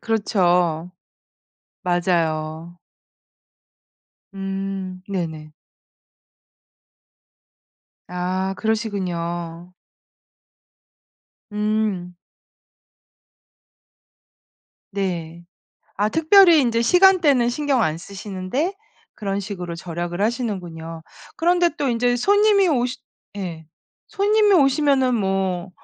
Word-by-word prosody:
그렇죠. 180 -6 +1 0.9
맞아요. 170 -2 -1 1.6
음 195 -1 -5
네네. 160 -5 -4 2.6
아 185 +2 -2
그러시군요. 175 -6 -3 1.8
음. 210 -4 -1 2.8
네. 175 -4 -4 0.5
아 210 +2 +1
특별히 330 - +6
인제 230 -2 +1
시간대는 320 -5 +5
신경 275 -1 0
안 155 -5 0
쓰시는데 200 - -4 0.4
그런 200 -1 -3
식으로 180 -4 -6
절약을 175 +2 -5
하시는군요. 175 -8 -3 0.3
그런데 350 +1 +3
또 280 - -1
인제 245 +1 +1
손님이 405 - +4
오시 250 -5 0 0.4
예 170 -5 -6 0.4
손님이 420 0 +3
오시면은 275 -4 +3
뭐 190 -3 -1
195 Hz, 155 characters per minute, -22 LUFS, 175-250 Hz, 2.8 s, 특별히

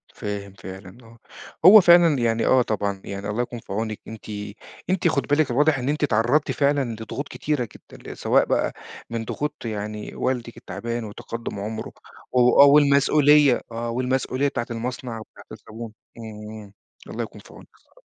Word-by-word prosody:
فاهم 100 -1 -5
فعلًا 95 +1 -11
آه، 115 0 -17 0.5
هو 205 +2 +10
فعلًا 170 -4 +6
يعني 115 -1 +1
آه 130 - +5
طبعًا، 100 -4 -2
يعني 100 +1 -5
الله 105 +4 -1
يكون 120 -1 -5
في 95 - -9
عونِك، 110 0 -3
أنتِ 110 -1 -10 0.6
أنتِ 185 -1 +1
خدي 145 -4 0
بالِك 145 -1 +2
الواضح 145 +3 +3
إن 125 +2 -2
أنتِ 150 +1 -1
اتعرضتِ 125 +4 +2
فعلًا 140 -4 +1
لضغوط 135 +6 -5
كتيرة 140 -7 -2
جدًا، - - -12
ل - - -10
سواء - - +3
بقى - - 0 0.4
من 115 -1 -4
ضغوط 150 +5 -3
يعني 105 -1 -5
والدِك 120 -2 -3
التعبان، 115 0 -5
وتقدُّم 110 0 -7
عمرُه 110 +2 -5 0.4
و 125 +1 +5
آه 140 - +10
والمسؤولية 145 -1 +5
آه 115 +1 -4
والمسؤولية 130 +2 -1
بتاعة 125 -4 -3
المصنع 120 0 -5
وبتاعة 110 - -14
الزبون، 110 0 -9 0.2
إمم، 105 -2 -9 0.3
الله - - -4
يكون - - -10
في - - -17
عونِك - - -14
الصراحة. - - -27
120 Hz, 165 wpm, -23 LUFS, 110-140 Hz, 0.6 s, هو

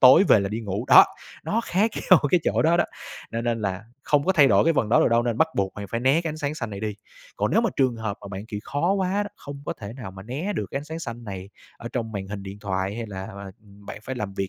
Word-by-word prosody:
tối 130 +9 +8
về 105 - +7
là 95 - -1
đi 110 +3 -3
ngủ. 105 +1 -3
Đó, - - +10 0.4
nó 225 - 0
khác 210 +5 +2 0.2
nhau 185 - +9
cái 180 - +4
chỗ - - +2
đó 165 +2 +4
đó, - - +3 0.5
cho 115 - -1
nên 115 -1 -1
là 100 +1 -2 0.2
không 145 -1 +2
có 190 - +3
thay 145 -6 +6
đổi - - +5
cái 165 - +4
phần 110 - +1
đó 115 - +5
được - - +4
đâu 115 0 +3
nên 120 -1 -1
bắt 160 - +4
buộc 95 -1 0
bạn 100 -1 -6
phải 115 - -1
né 135 +6 +3
cái 165 - -2
ánh 155 - -6
sáng 145 0 -2
xanh 115 -7 -5
này 100 0 -6
đi. 110 -1 -3 0.4
Còn - - 0
nếu - - +4
mà - - +1
trường 130 -4 +2
hợp 110 -2 -4
mà 100 - -9
bạn, 100 +2 -7
kiểu, 105 -3 -5
khó 170 +7 0
quá 195 +1 0
đó, 205 - -5
không 140 0 -9
có - - -1
thể 100 +1 -8
nào 125 -6 -8
mà 95 0 -10
né 145 - -3
được - - -3
cái 135 - -2
ánh 145 - -8
sáng 160 +1 -6
xanh 120 -5 -7
này 95 -2 -7 0.3
ở 115 - -6
trong 115 -3 -3
màn 95 -1 -4
hình 100 -1 -6
điện 100 +1 -8
thoại 95 -1 -2
hay 115 -1 -4
là, 95 -2 -6
à, 100 0 -8
bạn 100 0 -11
phải 130 - -5
làm 100 -4 -4
việc 95 -1 -2
115 Hz, 300 wpm, -25 LUFS, 100-145 Hz, 0.5 s, Đó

